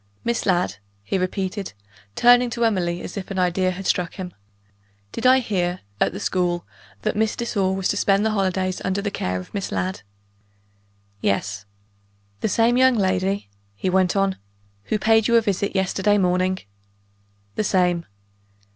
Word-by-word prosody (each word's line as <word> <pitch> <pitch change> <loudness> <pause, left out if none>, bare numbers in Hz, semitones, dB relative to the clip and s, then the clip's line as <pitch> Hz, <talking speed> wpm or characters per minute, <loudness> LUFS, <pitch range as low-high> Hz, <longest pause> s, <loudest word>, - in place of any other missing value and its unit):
"Miss 235 -2 -1
Ladd?" 175 - +1 0.3
he 190 - -1
repeated, 190 - -3 0.4
turning 245 0 +5
to 235 0 0
Emily 175 -5 0
as 180 - -7
if 195 - -5
an 195 - -4
idea 185 0 +2
had 185 +1 -5
struck 180 -1 0
him. 180 -2 -6 0.8
"Did 240 - 0
I 260 +1 +7
hear, 185 -7 -1 0.2
at - - +2
the 195 - -6
school, 180 -3 0 0.4
that - - 0
Miss 220 +1 +1
de 235 - -3
Sor 190 -4 0
was 190 -1 -1
to - - 0
spend 200 +1 +2
the 220 - +2
holidays 190 -2 0
under 190 +1 0
the 205 - -1
care 90 - -2
of 90 - -11
Miss 200 -2 -3
Ladd?" 185 +1 -2 1.2
"Yes." 100 0 -1 0.7
"The - - 0
same 230 +4 +3
young 260 -1 +5
lady," 190 - 0 0.3
he 185 - -1
went 185 0 +2
on, 195 -1 +1 0.5
"who 215 - 0
paid 220 +1 +3
you 235 - +3
a 230 - +6
visit 200 -2 -1
yesterday 190 +2 +2
morning?" 185 0 +1 1.0
"The - - -1
same." 180 -3 +1
190 Hz, 165 wpm, -23 LUFS, 180-210 Hz, 1.2 s, I